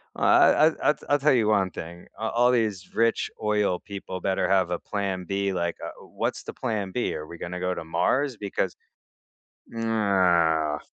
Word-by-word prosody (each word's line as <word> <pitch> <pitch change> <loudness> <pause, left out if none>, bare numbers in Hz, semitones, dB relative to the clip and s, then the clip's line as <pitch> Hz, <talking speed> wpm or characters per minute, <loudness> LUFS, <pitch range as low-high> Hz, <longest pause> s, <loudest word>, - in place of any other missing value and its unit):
I 155 - +5
I 165 - +3 0.2
I - - +5
t - - -24
I 145 - +4
tell 145 0 +3
you 115 -4 +2
one 95 -4 +2
thing. 85 +2 -9
A 110 0 -1
all 120 +2 +3
these 110 -6 -1
rich 115 0 +2
oil 105 -4 +1
people 95 -2 -7
better 95 -1 0
have 95 -2 +3
a 85 - -1
plan 95 -3 -3
B, 100 +1 -1
like, 85 -1 -1
uh, - - -4
what's - - -4
the - - -7
plan 105 -4 -3
B? 120 +5 -1
Are 75 - -6
we 85 - -10
gonna 90 +2 -5
go 90 0 -1
to - - -5
Mars? 115 - 0
Because 95 -3 -2 0.9
nah. 90 -9 +1
100 Hz, 185 wpm, -26 LUFS, 90-110 Hz, 0.9 s, I